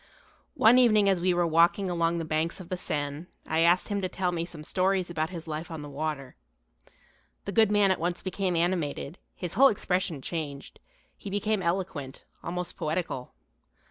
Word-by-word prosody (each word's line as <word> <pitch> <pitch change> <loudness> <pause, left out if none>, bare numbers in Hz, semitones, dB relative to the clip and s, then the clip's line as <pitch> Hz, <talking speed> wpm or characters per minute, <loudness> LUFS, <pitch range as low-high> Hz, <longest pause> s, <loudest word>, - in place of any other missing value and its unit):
One 235 +3 +6
evening 215 -5 +5
as 190 -3 +2
we 185 +1 +3
were 175 0 +2
walking 170 +4 +3
along 170 -1 0
the 165 - -3
banks 160 +4 -1
of 180 -2 -10
the 185 - -1
Seine 150 -2 -4 0.2
I 160 - 0
asked 170 +4 +3
him 200 -1 -1
to 185 - -1
tell 180 0 -1
me 170 -1 -2
some 165 -3 -10
stories 185 +1 0
about 160 -1 -1
his 170 -3 -8
life 155 +2 -5
on 160 -3 -6
the 145 - -8
water. 145 -2 -4 1.1
The 200 - -3
good 220 0 +4
man 205 -2 +4
at 190 - 0
once 175 +2 -2
became 185 -1 -1
animated, 165 -2 -1 0.2
his 175 -2 -4
whole 270 +6 +7
expression 185 - -1
changed, 145 -1 -6 0.4
he 200 - -8
became 205 +1 0
eloquent, 170 -6 -3 0.2
almost 180 +1 -4
poetical. 155 -5 -3
175 Hz, 180 wpm, -28 LUFS, 160-190 Hz, 1.1 s, whole